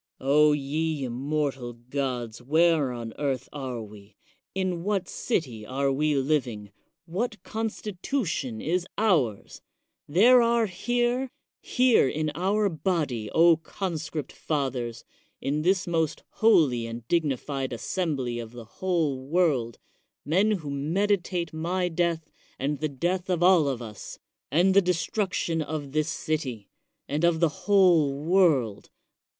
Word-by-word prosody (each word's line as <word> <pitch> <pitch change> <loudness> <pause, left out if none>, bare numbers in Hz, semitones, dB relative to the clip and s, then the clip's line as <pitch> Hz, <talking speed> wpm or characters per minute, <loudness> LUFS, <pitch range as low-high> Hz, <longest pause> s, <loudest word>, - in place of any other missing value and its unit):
O 150 +3 +4
ye 150 +1 -1
immortal 135 0 -2
gods, 120 -1 -4
where 155 0 +3
on 115 -2 -6
earth 135 -3 -1
are 130 -5 -4
we? 105 -1 -14 0.4
in 185 -3 -1
what 195 -2 -1
city 130 - -2
are 135 +5 -1
we 150 +2 +1
living? 130 -8 -1 0.3
what 215 +6 -3
constitution 210 - -3
is 175 +3 -1
ours? 155 - +1 0.5
There 235 +11 +6
are 235 -1 +3
here, 240 +6 0 0.2
— - - -61
^here 250 - +3
in 155 0 -1
our 200 +6 +1
body, 155 - -1
O 165 +4 +5
conscript 160 -4 -5
fathers, 130 -6 -3 0.4
in 145 +3 -1
this 185 +3 +2
the 175 - -5
most 160 -2 0
holy 145 - +3
and 115 0 -8
digni 155 -5 +1
fied 135 0 -4
assembly 130 -2 -2
of 115 0 -8
the 120 -2 -9
whole 150 -2 -1
world, 145 -9 +1 0.5
men 185 +9 +3
who 170 -9 -2
medi 180 +9 +1
tate 170 -2 -4
my 180 +3 -1
death, 165 -2 -1 0.3
and 140 +2 -2
the 155 - -1
death 175 +7 -2
of 175 -2 +1
all 180 -5 +5
of 130 -3 -2
us, 105 -3 -9 0.3
and 175 +7 +3
the 200 - +6
destruction 180 -1 -1
of 145 -2 -4
this 155 +2 0
city, 130 -12 -3 0.4
and 150 +3 -2
of 170 -1 +3
the 170 -1 +4 0.2
whole 180 -8 +5
world. 155 - +2
155 Hz, 135 wpm, -26 LUFS, 130-180 Hz, 0.5 s, There